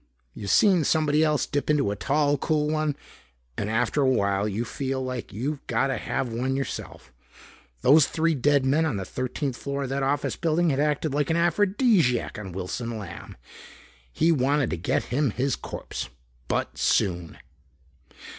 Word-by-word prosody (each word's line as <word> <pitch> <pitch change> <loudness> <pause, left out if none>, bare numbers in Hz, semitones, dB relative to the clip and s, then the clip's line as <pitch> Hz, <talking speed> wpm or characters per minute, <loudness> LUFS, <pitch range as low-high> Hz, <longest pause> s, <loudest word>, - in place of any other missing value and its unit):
You've 100 - -6
seen 190 -6 +5
somebody 155 0 +2
else 150 -2 +2
dip 145 +1 -2
into 145 -8 +2
a - - -2
tall 145 +6 +1
cool 150 +1 0
one 155 -2 0 0.6
and 105 - -3
after 120 +6 +1
a 135 - +4
while 100 -4 +1
you 110 +4 -2
feel 135 +2 -3
like 130 -2 -4
you 135 +8 -3
got 120 +2 +1
to 130 - -1
have 120 -3 -3
one 130 +3 -1
yourself. 135 - -6 0.7
Those 145 +2 +6
three 165 0 +1
dead 140 0 +2
men 145 +5 +3
on 145 -10 -1
the 95 - -4
thirteenth 130 - -3
floor 140 0 -3
of 130 - -4
that 135 +1 -1
office 140 +2 0
building 165 0 +1
had 135 - -1
acted 150 0 0
like 145 -1 0
an 165 - +2
aphrodisiac 175 - +2
on 95 -3 -7
Wilson 105 +6 -4
Lamb. 100 -5 -9 0.7
He 165 - +2
wanted 140 -2 +1
to - - 0
get 80 - 0
him 145 +1 +2
his 130 +5 -1
corpse. - - -6 0.4
But - - -2
soon. 85 -3 0
135 Hz, 170 wpm, -25 LUFS, 120-150 Hz, 0.7 s, Those